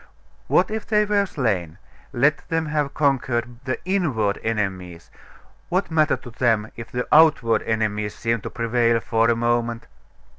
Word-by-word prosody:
What - - +2
if 220 -1 -4
they 210 -1 +3
were 205 -1 +1
slain? 100 - -2 0.3
Let 140 +4 +1
them 165 0 0
have 150 -2 -2
conquered 125 -4 0
the 130 - -1
inward 140 - 0
enemies, 95 -6 -3 0.6
what 185 0 -1
matter 155 -1 +2
to 125 - -12
them 115 -3 0
if 115 -1 -9
the 125 0 -3
outward 150 -8 +5
enemies 105 -2 -2
seemed 115 -1 -1
to - - -6
prevail 115 0 +1
for 115 0 +1
a 120 - +3
moment? 120 0 -1
120 Hz, 150 wpm, -22 LUFS, 110-150 Hz, 0.6 s, outward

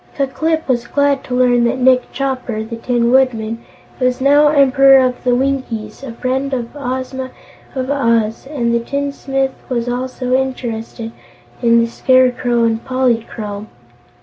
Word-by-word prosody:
Ku 280 - +1
Klip 315 +4 -2
was 240 -2 0
glad 285 0 +1
to 250 - -3
learn 245 -1 +3
that 235 - 0
Nick 255 0 +3
Chopper, 255 -5 -3
the 230 +1 -7
Tin 240 0 0
Woodman, 230 -3 +1 0.4
was 255 0 +1
now 285 +2 +5
Emperor 275 -2 +5
of 255 -1 +1
the 245 -1 +2
Winkies 250 -5 -2
and 265 -4 -7
a - - -17
friend 265 +2 -1
of 240 +2 -6
Ozma 260 -1 -4 0.5
of 260 +1 -2
Oz, 230 -4 0
and 240 -5 -1
the 235 - +2
tinsmith 270 +1 -2 0.2
was 240 -2 -2
also 255 +1 -3
interested 235 -3 -3 0.5
in 235 -1 +4
the 230 - +3
Scarecrow 245 -1 +2
and 225 0 0
Polychrome. 230 -5 -2
255 Hz, 150 wpm, -17 LUFS, 235-270 Hz, 0.5 s, now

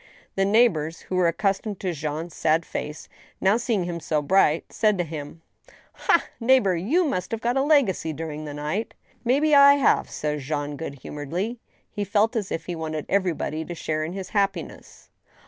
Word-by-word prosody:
The 195 - +1
neighbors, 190 -7 +2
who 185 - -5
were 180 -2 +3
accustomed 195 +3 -1
to 185 -2 -1
Jean's 155 +2 -4
sad 160 +2 +1
face, 150 +1 -6 0.3
now, 195 +3 +3
seeing 230 -5 0
him 175 -1 -4
so 155 -1 0
bright, 155 0 +2
said 210 -3 +2
to 175 - +1
him; 155 0 -8 0.3
" - - -22 0.2
Ha, - - +2
neighbor, 230 -6 +4
you 270 - +1
must 185 - -2
have 225 - -3
got 240 +2 0
a 270 - +3
legacy 275 - +2
during 155 0 -5
the 145 - -6
night! 150 +10 -3
" - - -34
" - - -36
May 255 +3 +3
be 305 0 +2
I 280 0 +8
have," 280 - +2
said 150 0 -3
Jean, 145 +1 -3
good 140 -1 -6
humoredly. 175 - -4 0.3
He 205 - -3
felt 210 +4 +1
as 210 -4 -2
if 165 - -3
he 175 - -4
wanted 155 -2 -4
everybody 175 -5 0
to 175 +2 -7
share 155 -1 -2
in 160 +3 -4
his 195 0 -6
happiness. 200 -2 -3
180 Hz, 200 wpm, -24 LUFS, 155-220 Hz, 0.3 s, I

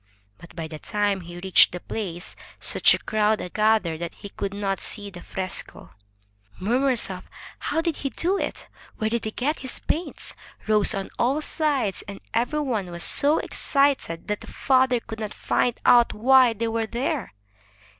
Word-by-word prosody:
But 175 0 -14
by 165 -2 -5
the 155 -1 -9
time 205 0 -1
he 175 0 -10
reached 190 -1 +5
the 180 - -4
place, 175 -3 -6 0.2
such - - +5
a - - -4
crowd 215 0 +1
had 180 - -7
gathered 215 -7 +2
that 170 -1 -5
he 205 - -10
could 200 0 -4
not 200 -1 -2
see 205 -1 -3
the 175 -2 -10
fresco. 190 -1 -4 0.7
Murmurs 245 +2 +2
of 185 -1 -8 0.3
"How 325 - -1
did 330 -2 -2
he 275 - -3
do 355 +7 0
it?" - - -4 0.3
"Where 220 0 -1
did 235 -1 -1
he - - -1
get 285 +8 -2
his 260 -1 -5
paints?" 340 +3 -4 0.3
rose 215 0 +3
on 195 -1 -4
all 265 +5 +2
sides, 290 - -1
and 200 -1 -8
every 245 +6 0
one 225 -10 -2
was 170 -1 -1
so 295 +3 +4
excited 275 - 0
that 210 -1 -2
the - - -11
father 260 -2 +2
could 225 -1 -8
not 215 -1 -5
find 245 -1 0
out 240 -1 +6
why 255 +1 +5
they 230 +1 -2
were 225 0 -1
there. 260 - -3
220 Hz, 180 wpm, -24 LUFS, 195-260 Hz, 0.7 s, out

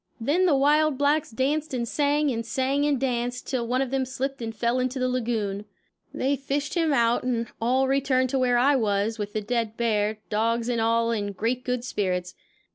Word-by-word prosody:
Then 310 +11 +2
the 305 - +4
wild 300 +1 +3
blacks 290 +2 +2
danced 275 +4 -1
and 235 -1 -2
sang 290 +2 +1
and 230 -1 -2
sang 270 +4 0
and 290 -3 +1
danced, 245 -1 -2
till 245 -4 -2
one 255 +3 +1
of 260 - -6
them 270 -1 +1
slipped 265 +1 -4
and 225 -1 -5
fell 235 +3 0
into 255 +1 -1
the 255 0 0
lagoon. 220 -5 -2 0.5
They 275 +2 0
fished 280 +1 -3
him 330 -3 +1
out 235 -3 +3
and 240 -2 -1 0.2
all 260 +3 +2
returned 260 -1 +1
to 270 - +1
where 250 -1 +3
I 275 +4 +4
was, 215 -1 0
with 205 0 -4
the 215 - -1
dead 225 0 -2
bear, 215 -2 0
dogs 230 +2 0
and 235 -2 0
all 230 +1 +2
in 205 -3 -2
great 235 +6 -2
good 250 -1 -2
spirits. 180 -6 -2
250 Hz, 200 wpm, -25 LUFS, 230-275 Hz, 0.5 s, the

